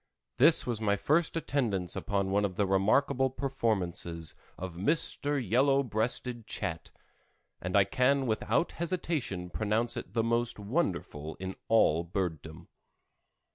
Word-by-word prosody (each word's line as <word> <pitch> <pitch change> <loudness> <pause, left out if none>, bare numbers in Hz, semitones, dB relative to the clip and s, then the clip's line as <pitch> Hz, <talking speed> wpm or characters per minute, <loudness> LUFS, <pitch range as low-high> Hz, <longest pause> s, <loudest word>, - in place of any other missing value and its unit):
This - - +5
was 115 -3 -2
my 100 -2 +2
first 155 - +1
attendance 110 - -1
upon 100 -2 -1
one 100 +1 +2
of 95 -3 -1
the 100 - +1
remarkable 125 +8 +2
performances 100 - -2 0.2
of 95 -1 -6
Mr. 145 - +1
Yellow 135 +5 +3
Breasted 120 0 -2
Chat, 80 -6 -4 0.7
and 90 +2 0
I 100 - +7
can 130 +7 +2
without 115 +8 0
hesitation 155 - -3
pronounce 110 +2 0
it 90 - -7
the 115 -1 +1
most 115 +1 +1
wonderful 95 - -2
in 95 0 -6
all 85 -7 +4
bird 85 -3 -2
dom. 80 0 -11
110 Hz, 135 wpm, -30 LUFS, 95-130 Hz, 0.7 s, I